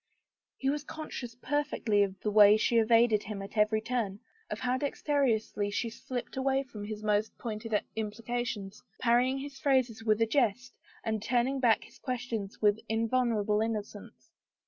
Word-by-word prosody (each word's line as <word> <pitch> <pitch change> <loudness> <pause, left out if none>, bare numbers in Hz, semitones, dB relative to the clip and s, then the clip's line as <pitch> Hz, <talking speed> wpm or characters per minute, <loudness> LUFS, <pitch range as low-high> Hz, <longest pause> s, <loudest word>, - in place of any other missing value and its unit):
He 270 0 +1
was 295 0 -3
conscious 305 -7 -7
perfectly 255 -6 0
of 195 -1 0
the 210 - -1
way 210 0 +8
she 235 +2 +2
evaded 225 -1 +4
him 210 -1 -6
at 195 - -10
every 215 0 +3
turn, 220 -4 -2 0.3
of - - -5
how 250 0 +1
dexterously 260 -7 0
she 225 +3 -2
slipped 245 +3 -6
away 270 +1 +1
from 215 -6 -8
his 215 0 -6
most 210 0 0
pointed 215 -1 -2 0.2
implications, 220 -1 -4 0.2
parrying 250 +2 +3
his 275 0 -7
phrases 255 -6 +1
with 215 -1 +2
a 225 - +4
jest 245 0 0 0.3
and 220 -1 -1
turning 250 +4 +1
back 235 -4 +3
his - - -17
questions 235 -5 -4
with 210 0 +4
invulnerable 225 -2 +1
innocence. 215 -2 -5
225 Hz, 155 wpm, -30 LUFS, 210-255 Hz, 0.3 s, way